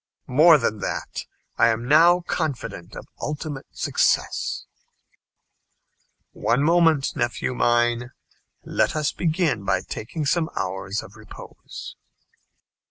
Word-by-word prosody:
"More 155 +5 +6
than 115 -5 -1
that, - - -4 0.3
I - - +6
am 115 +1 0
now 170 +5 +6
confident 135 - -4
of - - -8 0.2
ultimate 150 -2 -5
success." - - 0 1.7
"One 120 +4 0
moment, 165 -3 +3
nephew 120 +1 -1
mine. 120 0 +1 0.6
Let - - 0
us 150 -1 0
begin 160 - 0
by 95 - +1
taking 145 - -5
some 160 +2 +1
hours 95 +2 -3
of 100 - -14
repose." 110 -1 -11
135 Hz, 105 wpm, -23 LUFS, 115-160 Hz, 1.7 s, More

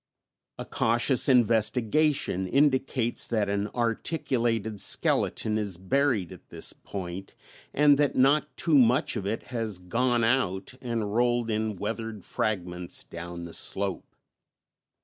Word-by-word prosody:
A - - -6
cautious 120 +4 +2
investigation 115 - +2
indicates 130 -2 +1
that 110 -3 0
an 100 +1 -1
articulated 115 - -1
skeleton 110 +2 +1
is 100 -5 -2
buried 115 - 0
at - - -14
this - - -3
point, 95 -1 -8 0.4
and 145 -1 +4
that 145 -1 +2
not 140 +4 +2
too 155 -4 +3
much 125 0 +3
of 100 - -3
it 110 +2 -3
has 110 -5 -3
"gone 120 +6 0
out" 115 -6 0
and 115 -4 -3
rolled 120 0 +1
in 110 -1 -1
weathered 110 0 -5
fragments 90 -4 -3
down 85 0 -8
the 85 - -10
slope. 95 +1 -1
115 Hz, 125 wpm, -27 LUFS, 100-125 Hz, 0.4 s, and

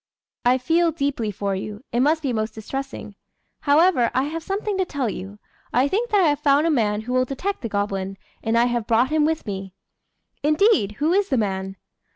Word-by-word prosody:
"I 250 +1 +5
feel 330 +6 +2
deeply 280 -7 -1
for 200 0 -2
you: 205 +4 -6
it 240 - 0
must 310 +4 +2
be 265 -3 0
most 215 -1 -2
distressing. 270 0 -6 0.5
However, 290 -4 +4
I 260 - +3
have 320 +3 -4
something 395 +4 -2
to - - +3
tell 285 -7 -2
you. 195 +3 -8 0.3
I 255 +3 +3
think 450 +10 -1
that 410 -2 +3
I 325 - +5
have 290 -1 0
found 290 0 +3
a 335 - +3
man 215 -6 +1
who 245 +3 -5
will 255 0 +3
detect 315 +10 -3
the 230 - -4
goblin; 195 -1 -2 0.3
and 225 +1 +1
I 235 - +5
have 240 -2 -1
brought 240 +4 +3
him 310 -1 +3
with 320 0 -1
me." 195 -2 -6 0.7
"Indeed! 305 - +3
who 305 +10 0
is 400 +1 +2
the 265 - +1
man?" 195 -3 -2
255 Hz, 205 wpm, -23 LUFS, 215-315 Hz, 0.7 s, I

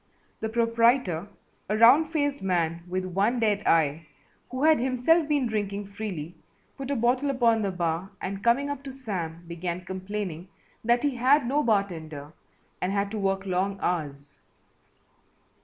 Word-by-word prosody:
The 220 - -2
proprietor, 230 -5 +2 0.4
a 210 - +1
round 275 +8 +6
faced 285 -3 0
man 170 -3 0
with 185 +1 -2
one 200 +7 +1
dead 210 -3 +1
eye, 155 -1 +2 0.4
who 255 +2 -3
had 315 0 +5
himself 265 +6 +2
been 290 -4 +1
drinking 205 -3 -2
freely, 190 -6 -5 0.4
put 270 -1 -6
a 280 - 0
bottle 250 +4 +1
upon 235 -4 +3
the 200 - 0
bar 175 0 -2
and 195 +1 -5
coming 240 +4 +3
up 285 -2 -5
to 270 - -6
Sam, 180 -10 -5
began 175 +1 -4
complaining 190 -2 -5 0.4
that 240 +3 +2
he 280 -4 0
had 265 +3 +4
no 280 +5 +1
bartender 160 - -2 0.5
and 180 - 0
had 200 0 -1
to 220 - -3
work 195 0 0
long 195 +1 -1
hours. 145 -5 -3
205 Hz, 155 wpm, -27 LUFS, 180-250 Hz, 0.5 s, round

